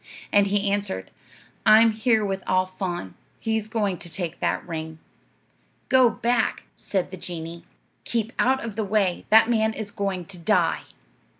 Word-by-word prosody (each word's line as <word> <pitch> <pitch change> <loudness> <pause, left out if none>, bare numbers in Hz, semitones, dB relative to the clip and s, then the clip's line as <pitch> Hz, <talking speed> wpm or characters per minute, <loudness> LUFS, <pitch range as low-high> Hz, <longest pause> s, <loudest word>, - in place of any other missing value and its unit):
And 205 -1 +5
he 200 0 +1
answered, 200 - -2 0.5
'I'm 220 +1 +7
here 220 0 +2
with 195 -1 -2
Al 185 0 +3
Faan; 180 - -5 0.3
he's 220 -1 -1
going 210 -4 -1
to 170 - -7
take 170 -1 -4
that - - -1
ring.' 160 -1 -5 0.9
'Go 260 -2 +6
back,' 235 0 0
said 190 -3 -2
the 185 - -7
genie; 170 -1 -7 0.4
'keep 230 -1 -2
out 265 +2 +2
of 225 -3 -5
the 220 - -1
way. 200 -3 0
That 220 +1 +7
man 220 -2 +1
is 210 -2 -6
going 195 -3 -3
to 185 -1 -7
die.' 165 - +1
200 Hz, 160 wpm, -24 LUFS, 180-220 Hz, 0.9 s, I'm